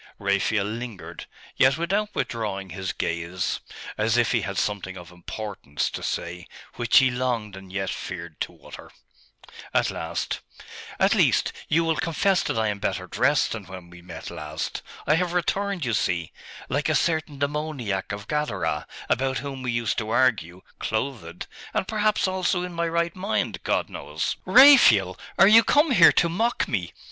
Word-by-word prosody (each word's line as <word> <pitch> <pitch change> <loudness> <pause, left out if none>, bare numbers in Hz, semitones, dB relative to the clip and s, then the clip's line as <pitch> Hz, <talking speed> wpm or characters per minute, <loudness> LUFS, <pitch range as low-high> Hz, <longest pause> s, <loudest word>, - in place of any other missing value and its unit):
Raphael 100 +1 +1
lingered, 115 -1 -7 0.3
yet 130 +2 +4
without 200 +5 -1
withdrawing 100 -5 -3
his 95 +2 -3
gaze, 85 +1 -2 0.4
as 110 +2 +2
if 120 -2 +3
he - - +2
had 100 0 -4
something 95 -2 -2
of 90 -1 -11
importance 90 -4 -4
to - - -6
say, 85 +1 -4 0.3
which 120 - +3
he 130 -2 +6
longed 120 -5 -2
and 95 -1 -11
yet 95 0 -2
feared 85 -4 -7
to - - -4
utter. - - -11 0.9
At - - +3
last - - -3 0.6
'At - - +4
least, - - +3 0.2
you 165 +2 +3
will 165 -1 0
confess 180 +3 +1
that - - -2
I 110 -1 +1
am 100 -1 -3
better 90 - -2
drest 140 +10 +2
than 110 -4 -5
when 90 -2 -10
we 85 0 -13
met 85 -2 -9
last. 75 +1 -5 0.2
I 150 - +3
have 175 +2 0
returned, 195 -1 -1
you 120 - -1
see, 85 -5 0 0.4
like - - -1
a - - +2
certain 155 -3 0
demoniac 140 -9 -2
of 100 0 -6
Gadara, 150 0 -2 0.2
about 130 0 0
whom 135 0 -5
we 125 -1 -2
used 115 0 0
to 110 -1 -4
argue, 105 -8 +1 0.2
clothed 110 -7 -3 0.3
and 185 - 0
perhaps 215 -2 +1
also 185 -1 0
in 180 -1 -5
my 170 0 -1
right 170 0 0
mind.... 195 +3 -1
God - - 0
knows!' - - -3
'Raphael! 180 - +7 0.2
are 190 - +7
you 225 +2 +8
come 295 +4 +3
here 185 -9 +8
to 170 - +3
mock 225 +8 0
me? 90 -7 -2
120 Hz, 170 wpm, -25 LUFS, -, 0.9 s, you